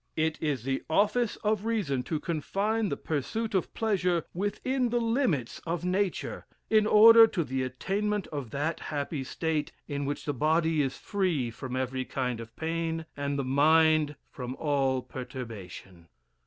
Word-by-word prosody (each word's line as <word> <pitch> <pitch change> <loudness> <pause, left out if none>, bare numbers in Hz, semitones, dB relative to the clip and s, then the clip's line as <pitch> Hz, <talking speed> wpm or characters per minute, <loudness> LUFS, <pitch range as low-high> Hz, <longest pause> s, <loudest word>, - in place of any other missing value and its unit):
It 160 0 0
is 145 -7 -1
the 135 +1 -1
office 210 +7 +2
of 210 -1 +1
reason 205 - 0
to 155 - -2
confine 200 +7 -1
the - - -2
pursuit 210 - -3
of 190 - 0
pleasure 180 -6 +1
within 235 +7 -1
the 240 +1 +1
limits 225 - 0
of 170 +1 -3
nature, 190 +1 -1 0.2
in 215 -1 +5
order 225 +2 +9
to 180 -6 -1
the 130 -2 -2
attainment 195 +10 -1
of 140 -6 -5
that 145 +6 -2
happy 145 -1 -3
state, 155 +2 -2 0.2
in 145 -1 -3
which 145 +1 -3
the 145 - -1
body 160 +3 +2
is 135 -2 -2
free 175 - -1
from 130 +2 -6
every 130 0 -1
kind 125 -3 -2
of 115 0 -10
pain, 165 0 -2
and 140 0 -2
the 140 - 0
mind 155 +2 +4 0.2
from 125 -1 -6
all 135 -4 0
perturbation. 100 -9 -8
160 Hz, 155 wpm, -29 LUFS, 135-200 Hz, 0.2 s, order